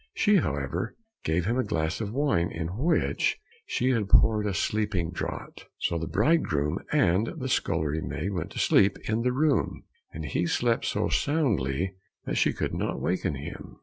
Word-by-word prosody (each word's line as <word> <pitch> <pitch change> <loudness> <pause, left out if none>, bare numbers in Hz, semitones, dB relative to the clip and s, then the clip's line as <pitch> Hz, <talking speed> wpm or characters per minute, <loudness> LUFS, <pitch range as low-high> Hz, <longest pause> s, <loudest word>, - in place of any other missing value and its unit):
She, 210 -1 +4
however, 75 - -2 0.3
gave 80 +2 0
him 120 +5 +1
a - - +2
glass 80 +1 -1
of 105 -2 -3
wine 115 -11 +1
in 80 0 -4
which 155 +9 +1 0.3
she 130 +1 +1
had 110 -5 0
poured 105 -1 +4
a 100 - -1
sleeping 100 -5 0
draught. 85 - -6
So 85 - -1
the 80 - -3
bridegroom 95 - +1
and 105 - +3
the 130 -3 -3
scullery 80 - 0
maid 95 +5 -3
went 90 -4 -3
to - - -9
sleep 100 0 +4
in 110 +1 +1
the 125 +1 +1
room, 135 - +1 0.3
and 80 0 -6
he 85 +5 0
slept 115 +5 +1
so - - 0
soundly 95 - 0 0.3
that - - -2
she - - +3
could - - -3
not - - -2
waken 90 -3 -1
him. 70 +2 -8
95 Hz, 175 wpm, -27 LUFS, 80-120 Hz, 0.3 s, She